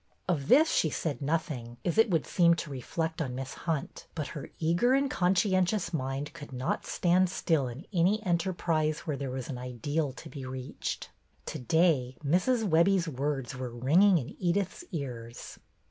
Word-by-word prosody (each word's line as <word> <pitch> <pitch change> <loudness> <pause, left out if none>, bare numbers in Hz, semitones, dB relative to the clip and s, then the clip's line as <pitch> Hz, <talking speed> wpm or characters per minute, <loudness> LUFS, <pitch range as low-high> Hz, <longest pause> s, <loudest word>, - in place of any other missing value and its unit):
Of 150 -7 0
this 315 +5 +6
she 160 - +2
said 150 0 -3
nothing, 140 -6 -2
as 175 +3 +1
it 225 - +6
would 165 -5 +1
seem 170 -2 +4
to 155 -2 -5
reflect 160 +5 -3
on 130 -5 -3
Miss 130 0 -5
Hunt; 160 -5 -4
but 150 -3 -3
her 145 - -7
eager 175 +10 +2
and 275 0 +2
conscientious 185 0 +2
mind 135 0 -3
could 145 -4 -10
not 130 0 -2
stand 180 +1 +3
still 160 -6 +1
in 125 +9 -8
any 185 +4 +3
enterprise 170 -3 0
where 150 - -3
there 135 -1 -4
was 130 -1 -4
an 125 -3 -5
ideal 135 +4 -2
to 160 - -10
be 145 -3 -8
reached. 130 0 -5 0.3
To - - -5
day 145 -3 +2
Mrs. 215 - +2
Webbie's 175 +1 +4
words 140 -2 -2
were 130 -1 -4
ringing 160 +12 +4
in 130 -6 -5
Edyth's 190 - 0
ears. 120 -8 -6
160 Hz, 170 wpm, -29 LUFS, 135-180 Hz, 0.3 s, this